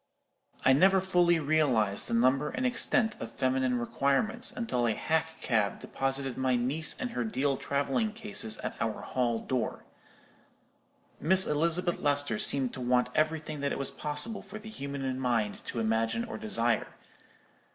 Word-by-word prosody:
"I 130 - +7
never 190 +7 +5
fully 180 -2 +3
realized 140 -10 +1
the - - -1
number 130 +5 +3
and 255 - -3
extent 240 -2 +2
of - - -7
feminine 130 -1 +1
requirements 140 - 0
until 125 - -1
a 110 - 0
hack 160 0 -1
cab 110 -5 0
deposited 135 -1 -2
my 130 -1 +2
niece 135 +6 -1
and 250 - -3
her - - -2
deal 145 -11 0
travelling 140 - -1
cases 210 - -2
at - - -4
our 115 -1 -2
hall 120 -3 -1
door. 120 0 -3 1.3
Miss 190 +5 +6
Elizabeth 170 +4 +1
Lester 145 -6 +2
seemed 135 -3 +2
to 130 - -6
want 125 0 +2
everything 155 -1 -1
that 140 0 -1
it - - -2
was 140 - -3
possible 150 +9 -2
for 205 +1 -9
the 215 0 -10
human 135 -7 -4
mind 115 -5 -1
to 115 - -4
imagine 115 - 0
or 230 - -7
desire. 120 - 0
140 Hz, 155 wpm, -29 LUFS, 125-175 Hz, 1.3 s, I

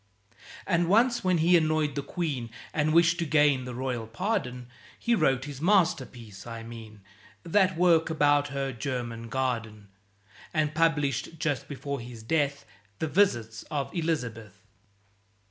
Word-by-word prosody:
And 175 -3 +1
once, 235 +4 +3
when 185 -1 +2
he 170 +3 +4
annoyed 155 -3 +2
the 140 - -2
Queen, 140 -8 -3 0.2
And 155 0 +1
wished 165 +1 +4
to - - +1
gain 145 -4 +3
the 125 -1 -6
royal 125 -3 -3
pardon, 125 - -2 0.3
He 235 - 0
wrote 135 - +2
his 145 -2 -8
masterpiece; 130 - 0
I 115 -1 -7
mean 110 -2 -10 0.4
That 185 0 +2
work 170 -2 +4
about 145 -2 +3
her 135 -1 -3
German 115 -2 -4
Garden; 115 -5 -3 0.7
And 155 -1 +1
published, 160 -1 0
just 150 -5 -2
before 140 0 -5
his 120 -1 -9
death, 140 +2 0 0.3
The - - -2
"Visits 120 - +1
of 140 -2 -3
Elizabeth." 115 - -3
145 Hz, 140 wpm, -28 LUFS, 120-165 Hz, 0.7 s, he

